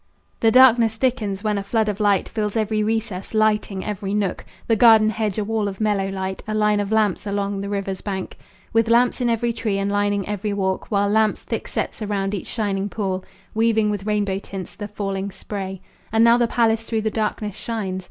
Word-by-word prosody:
The 225 - +4
darkness 235 -2 +6
thickens, 215 -5 -1
when 210 -2 0
a - - -4
flood 220 +2 0
of 210 0 -2
light 205 -3 +2
Fills 210 -1 -3
every 215 -1 +1
recess, 215 -2 -2
lighting 210 -3 +1
every 205 -1 -3
nook; 200 -3 -1 0.2
The 225 - +2
garden 220 -1 +6
hedge 215 -2 -2
a 215 - 0
wall 215 0 -1
of 195 -1 -5
mellow 205 -3 +1
light, 190 0 -4
A 215 - -2
line 210 -1 +2
of 205 0 -2
lamps 210 -2 +1
along 200 0 -2
the 200 - -4
river's 195 -2 -3
bank, 190 -2 -5 0.3
With 225 0 +3
lamps 245 +2 +3
in 240 - +2
every 235 +1 0
tree 215 -3 -1
and 195 0 -1
lining 205 -1 0
every 210 0 -2
walk, 190 -1 -2
While 200 -1 +2
lamps 215 0 +2
thick - - -4
set - - -2
surround 205 -2 -2
each 200 - -4
shining 200 -3 -2
pool, 190 -2 -2 0.3
Weaving 220 -1 +2
with 205 0 -4
rainbow 205 -2 0
tints 195 -2 -8
the 205 - -6
falling 195 -1 -3
spray. 190 -1 -6 0.3
And 225 +1 +4
now 235 +1 +6
the 240 - +3
palace 225 -1 +2
through 225 -1 -2
the 215 0 -1
darkness 210 -2 -2
shines. 205 -6 -3
210 Hz, 205 wpm, -22 LUFS, 195-220 Hz, 0.3 s, darkness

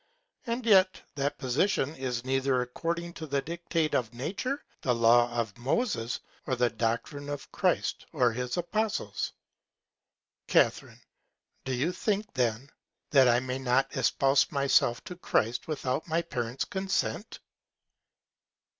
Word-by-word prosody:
And 235 +1 -2
yet 190 -4 +5
that 140 0 -1
Position 145 +3 +1
is 125 -2 -3
neither 135 0 +1
according 170 +7 -3
to 160 - -7
the 140 -1 0
Dictate 170 -1 -1
of 120 -1 0
Nature, 205 - -3 0.2
the 125 -2 +1
Law 120 +1 +5
of 115 -4 -2
Moses, 130 - 0 0.3
or 130 - +1
the 125 -1 +2
Doctrine 120 +6 -2
of 145 -1 -6
Christ - - 0
or 125 -1 +3
his 125 +4 -3
Apostles. 175 - -1 1.2
Ca. - - +5 0.9
Do 130 - -1
you 145 +8 +1
think 205 +3 -2
then, 125 +1 -1 0.4
that 135 -3 +6
I 120 0 +4
may 130 +1 -3
not 130 +1 +1
espouse 135 +2 +3
myself 140 -4 +2
to 180 - -7
Christ 120 -8 0
without 145 -1 -2
my 165 +1 +1
Parents 125 -3 -3
Consent? 195 +2 -2
135 Hz, 130 wpm, -29 LUFS, 125-170 Hz, 1.2 s, that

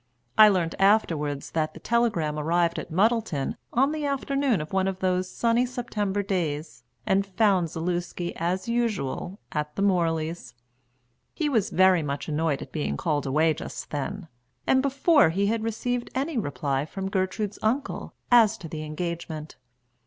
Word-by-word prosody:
I 215 -1 +9
learnt 175 -5 +1
afterwards 165 -9 +2
that 155 -1 -1
the - - -9
telegram 195 -11 0
arrived 170 +2 +1
at - - -8
Muddleton 205 - +1 0.2
on 270 +4 +3
the 310 -1 -3
afternoon 275 - 0
of 155 +3 -6
one 190 0 +2
of 190 -1 -2
those 185 0 0
sunny 235 +1 +2
September 210 -5 -2
days 160 - -2 0.2
and 195 +1 +3
found 195 -3 +2
Zaluski 175 +1 -3
as 180 +4 -1
usual 215 - -2
at 150 0 -3
the 200 - 0
Morleys. 165 -8 0 0.8
He 310 -2 0
was 225 -8 +1
very 185 -1 +4
much 140 -1 -4
annoyed 155 -2 0
at - - -14
being 155 - -2
called 150 -4 -1
away 155 +4 +3
just - - -7
then, 170 +6 -4 0.4
and 260 - +4
before 280 - +4
he 195 +5 0
had 220 +2 0
received 240 +2 -2
any 280 +4 -1
reply 140 - -1
from 190 +5 -5
Gertrude's 195 +2 -2
uncle 255 +6 -2 0.2
as 225 -3 +6
to 170 - -8
the 155 -1 -6
engagement. 155 0 -5
185 Hz, 155 wpm, -26 LUFS, 160-225 Hz, 0.8 s, I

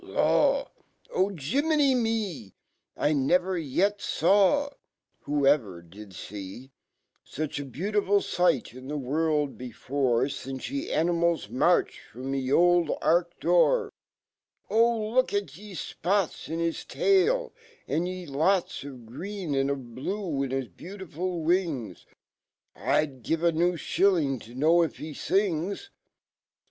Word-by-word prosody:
Lawl - - +2 0.6
,J 165 - -1
jirnmeny 295 -3 +3
rnel 210 - -2 0.4
1 145 -3 +1
never 180 +1 +2
yet 180 +6 0
$awl 205 - +3 0.5
\Vho 145 -1 +2
ever 105 - +2
did 95 +3 -13
see 105 +6 -8 0.5
Such 155 0 -4
abeautiful 195 - 0
sight 175 -9 +1
infheworld 145 +3 -1
before, 125 0 0
Since 135 -2 -6
y 280 - -2
e 290 - -4
animals 170 -6 +1
rr\arched./romy 130 +2 0
c 130 - -3
oldark 175 +1 +3
d - - -6
O!Lookaty 225 - 0
e 210 -1 -10
fpots 185 0 -2
Inhistail! 385 - +1 0.4
Andy 180 +2 -2
lots 165 +6 0
Of 130 -4 -10
green 175 - -5
and 135 0 +1
of 130 -4 -4
blue 165 - -3
in 135 - -1
his 135 -1 -2
beautifu 180 -2 -5
living 165 - 0 0.8
I'd 140 -4 0
give 165 +9 -1
a 170 - +4
new 175 +2 +1
Shilling 165 -6 +1
to 120 +2 -13
know 160 +6 +4
if 165 - -1
he 155 - -7
ilngs 195 - -1
165 Hz, 110 wpm, -27 LUFS, 135-195 Hz, 0.8 s, a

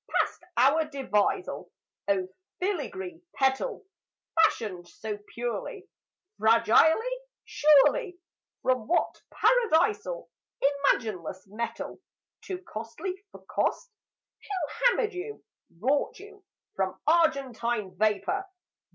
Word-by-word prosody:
Past - - 0
our 285 +6 +5
devisal 275 - -1 0.4
(O 190 -2 +1 0.3
filigree 360 -1 -3
petal!) 270 - 0 0.5
Fashioned 205 - +2
so 210 +3 -6 0.2
purely, 245 - -4 0.5
Fragilely, 235 - +4 0.3
surely, 305 - +4 0.5
From 255 -4 +1
what 350 - +1
Paradisal 435 0 +2 0.4
Imagineless 220 - 0
metal, 215 +4 -5 0.4
Too 370 - -4
costly 235 - -5 0.2
for - - -14
cost? - - -1 0.5
Who 370 -3 -3
hammered 455 -3 +2
you, 390 +4 -6 0.4
wrought 275 +7 +1
you, 410 0 -13 0.3
From 190 -1 -1
argentine 250 - +1
vapour? 215 - 0
285 Hz, 90 wpm, -28 LUFS, -, 0.5 s, our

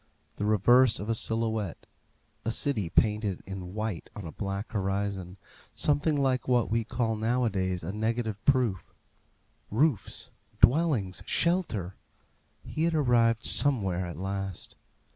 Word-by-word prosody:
The 105 - -2
reverse 110 +4 +5
of 105 - -5
a - - +3
silhouette 110 -4 -1 0.6
a 115 - -1
city 110 -6 -1
painted 105 -1 +1
in 95 0 -7
white 110 -5 -4
on 105 - -7
a 80 - -6
black 100 +3 -5
horizon, 95 -2 -2 0.4
something 145 +1 +2
like 130 -2 0
what 125 -4 +2
we 115 0 +1
call 115 0 -1
nowadays 105 -6 0
a 85 - -3
negative 110 0 -2
proof. 125 -9 +1 0.7
Roofs 125 -1 0 0.3
dwellings 130 - +3
shelter! 160 - 0 0.7
He 160 - -1
had 170 -1 +1
arrived 120 -5 +3
somewhere 95 -11 +2
at 85 -3 -7
last. 95 0 -5
110 Hz, 125 wpm, -28 LUFS, 95-125 Hz, 0.7 s, reverse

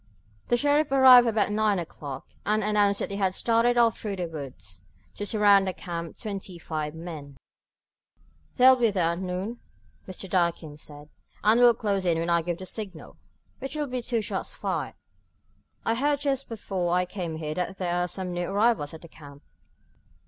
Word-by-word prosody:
The 240 - +2
sheriff 290 +2 +2
arrived 260 -3 +8
about 220 -2 +1
nine 210 -1 +2
o'clock, 145 -5 -7 0.2
and 215 +1 +1
announced 205 -1 +2
that - - -3
he 200 - -3
had 190 -2 0
started 235 +1 +2
off 230 -2 +3
through 205 -2 -4
the 180 -2 -3
woods, 130 - -9 0.3
to 205 - -4
surround 205 -3 +4
the 185 - -1
camp, 170 -2 -6
twenty 195 -4 -5
five 155 -2 -4
men. 155 -5 -8 1.2
"They'll 260 0 +7
be 235 -2 +3
there 180 -5 +1
at 170 - -4
noon," 190 +6 -4 0.5
Mr. 190 +1 -7
Durkin 170 -4 -1
said, 145 0 -12 0.3
"and 220 +3 +5
will 240 -1 +7
close 200 -4 -1
in 170 -3 +1
when 165 +1 -1
I 170 0 +3
give 170 0 -3
the 185 - -8
signal, 190 -5 -5 0.4
which 270 +2 -5
will 300 -1 -1
be 255 -2 -4
two 230 -2 -1
shots - - -4
fired. - - -3 0.9
I 225 - +2
heard 285 +4 +1
just 275 -2 -1
before 190 -6 -2
I 180 0 +2
came 180 -3 -5
here 155 -1 -4
that 180 +3 -3
there 175 -2 -2
are 175 0 0
some 180 0 -5
new 175 0 -2
arrivals 200 -7 +1
at 160 - -13
the - - -10
camp." 145 -3 -14
195 Hz, 185 wpm, -26 LUFS, 170-230 Hz, 1.2 s, arrived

